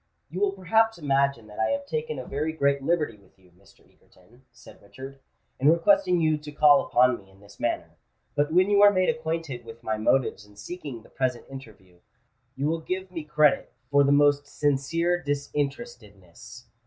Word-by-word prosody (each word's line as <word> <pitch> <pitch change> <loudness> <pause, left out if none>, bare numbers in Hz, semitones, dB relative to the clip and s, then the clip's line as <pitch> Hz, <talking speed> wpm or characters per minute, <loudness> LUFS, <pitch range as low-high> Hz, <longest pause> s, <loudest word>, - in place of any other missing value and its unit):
"You 180 - -5
will 200 -1 +1
perhaps 225 +4 +1
imagine 140 -5 0
that 105 -1 -12
I 110 - +2
have 190 0 -2
taken 155 -4 -4
a 130 - -6
very 150 +3 -3
great 140 -2 +1
liberty 150 -6 -1
with 100 -2 -26
you, 90 -2 -25
Mr. 90 +3 -24
Egerton," 110 +8 -25
said - - -17
Richard, 135 +6 -11 0.4
"in 140 +3 +4
requesting 180 - +3
you 155 -2 +1
to 150 0 -10
call 145 -1 +5
upon 125 0 +2
me 95 -1 -20
in 95 0 -22
this 100 0 -18
manner; - - -3 0.3
but 145 +1 0
when 185 +4 +3
you 200 0 +4
are 205 - +9
made 185 0 +1
acquainted 165 - -3
with 115 0 -13
my 110 -1 -2
motives 115 -1 +1
in 105 0 -20
seeking 120 - -8
the - - -19
present 125 -2 -2
interview, 105 -9 -13 0.6
you 135 - -3
will 165 +2 -1
give 185 +2 -5
me 165 -3 -6
credit 150 -1 +2 0.2
for 140 0 +5
the 140 - +2
most 145 0 +3
sincere 155 +5 0
disinterestedness. 140 - -6
145 Hz, 185 wpm, -26 LUFS, 120-165 Hz, 0.6 s, are